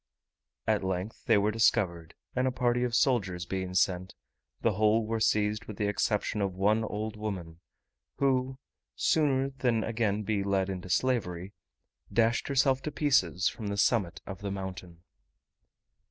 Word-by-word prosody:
At - - +1
length 95 +3 -4
they - - +5
were 105 +1 +2
discovered, 90 -7 +1 0.2
and 130 +1 +2
a - - +1
party 125 -1 +1
of 120 -1 0
soldiers 100 -10 +1
being 95 -1 -4
sent, 95 -1 +1 0.5
the 115 - +3
whole 110 +2 +2
were 115 +1 -1
seized 105 0 +1
with 105 - -8
the 105 - 0
exception 105 0 0
of 95 -2 -1
one 105 +4 +2
old 110 0 -4
woman, 95 -6 -5 0.6
who, 130 -1 +1 0.4
sooner 135 -3 +2
than 125 -4 0
again 110 -2 0
be 105 -1 0
led 95 -1 0
into 95 -1 -5
slavery, 95 -3 0 0.6
dashed 115 0 +2
herself 135 -1 +2
to 150 - -4
pieces 140 - +2
from 110 - -4
the 100 0 -2
summit 100 -3 +1
of 95 +1 -8
the 100 - -3
mountain. 90 -3 -7
105 Hz, 155 wpm, -29 LUFS, 95-120 Hz, 0.6 s, they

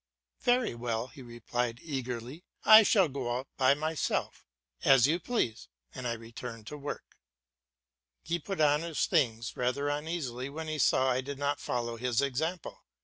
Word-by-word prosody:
"Very 245 - +2
well," 120 0 -3
he 140 - -13
replied 120 0 -3
eagerly, 130 +1 -5 0.2
"I 215 0 +11
shall 200 -3 +4
go 130 -4 -2
out 130 +1 -6
by 135 +1 +4
myself." 155 +1 -2 0.4
"As 135 -3 +6
you 160 +5 +2
please," 145 - -2 0.3
and 125 - -5
I 120 - 0
returned 115 0 -8
to 150 - -6
my - - -14
work. 145 - -7 1.0
He 170 +3 -1
put 195 +3 -5
on 150 0 +4
his 165 -2 -1
things 120 - 0
rather 130 +4 0
uneasily 145 -4 -3
when 160 +3 -6
he 155 -1 -3
saw 130 -1 +3
I 125 +1 +1
did 140 +1 -6
not 145 0 -1
follow 120 -1 -3
his 120 -1 0
example. 155 +6 -2
135 Hz, 165 wpm, -30 LUFS, 120-155 Hz, 1.0 s, I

